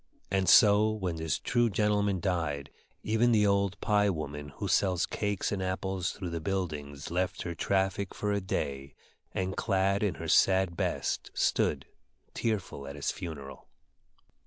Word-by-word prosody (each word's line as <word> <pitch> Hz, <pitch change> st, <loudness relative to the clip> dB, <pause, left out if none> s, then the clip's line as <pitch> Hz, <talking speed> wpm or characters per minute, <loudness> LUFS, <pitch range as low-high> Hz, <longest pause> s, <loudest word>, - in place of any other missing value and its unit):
And 95 Hz, -2 st, +2 dB
so 105 Hz, +3 st, +7 dB
when 95 Hz, -6 st, -2 dB
this 80 Hz, 0 st, -1 dB
true 120 Hz, -1 st, +1 dB
gentleman 105 Hz, -2 st, +1 dB
died, 80 Hz, -7 st, -2 dB, 0.3 s
even 110 Hz, +2 st, +2 dB
the 105 Hz, -2 st, +4 dB
old 100 Hz, -2 st, +1 dB
pie 105 Hz, -1 st, +3 dB
woman 75 Hz, -4 st, -4 dB
who -, -, -4 dB
sells 90 Hz, -3 st, +2 dB
cakes 100 Hz, -2 st, -2 dB
and 100 Hz, -2 st, -2 dB
apples 95 Hz, -1 st, -2 dB
through 90 Hz, -4 st, -6 dB
the 85 Hz, -1 st, -3 dB
buildings 75 Hz, -6 st, -4 dB
left 90 Hz, +2 st, -1 dB
her 85 Hz, -, -4 dB
traffic 95 Hz, +2 st, -1 dB
for 105 Hz, -, -1 dB
a 100 Hz, 0 st, 0 dB
day, 70 Hz, -6 st, -3 dB, 0.4 s
and, 95 Hz, 0 st, -2 dB
clad 95 Hz, +1 st, +1 dB
in 105 Hz, -3 st, 0 dB
her -, -, -6 dB
sad 95 Hz, -2 st, +4 dB
best, -, -, -2 dB
stood, -, -, +1 dB, 0.5 s
tearful 95 Hz, -11 st, -2 dB
at 70 Hz, -, -7 dB
his 75 Hz, -, -1 dB
funeral. 75 Hz, -7 st, -8 dB
95 Hz, 155 wpm, -30 LUFS, 85-100 Hz, 0.5 s, so